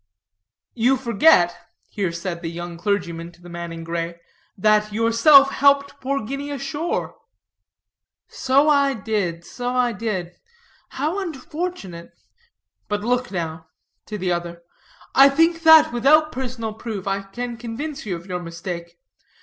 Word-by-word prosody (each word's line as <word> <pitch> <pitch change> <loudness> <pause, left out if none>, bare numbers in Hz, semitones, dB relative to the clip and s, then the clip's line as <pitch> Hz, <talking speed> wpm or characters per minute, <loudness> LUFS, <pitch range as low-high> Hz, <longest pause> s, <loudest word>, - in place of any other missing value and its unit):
"You 250 +3 +2
forget," 235 - +4 0.3
here 195 -4 -2
said 170 0 -5
the 165 - -4
young 175 +1 -7
clergyman 170 -3 -2
to 175 - -22
the 175 - -11
man 170 0 -6
in 165 0 -7
gray, 170 0 -4 0.4
"that 210 +1 +2
yourself 230 +6 +6
helped 280 0 +2
poor 270 -3 -2
Guinea 275 +4 -5
ashore." 290 - -3 1.1
"So 275 +3 +2
I 280 -2 +3
did, 190 -6 -2
so 245 0 -5
I 250 -1 +2
did; 190 -5 -4 0.5
how 310 +8 -2
unfortunate. 305 - -6 0.7
But 205 0 -2
look 245 +3 0
now," 160 -3 -5 0.4
to 210 - -5
the 185 -2 -2
other, 170 0 -4 0.5
"I 275 +1 +8
think 330 +4 +2
that 320 -4 +7
without 305 +6 +4
personal 245 -4 -4
proof 215 -3 -6
I 195 0 -1
can 240 +5 -6
convince 245 +6 -6
you 195 -4 -3
of 170 0 -10
your 180 -2 -4
mistake. 170 0 -7
220 Hz, 140 wpm, -22 LUFS, 175-275 Hz, 1.1 s, I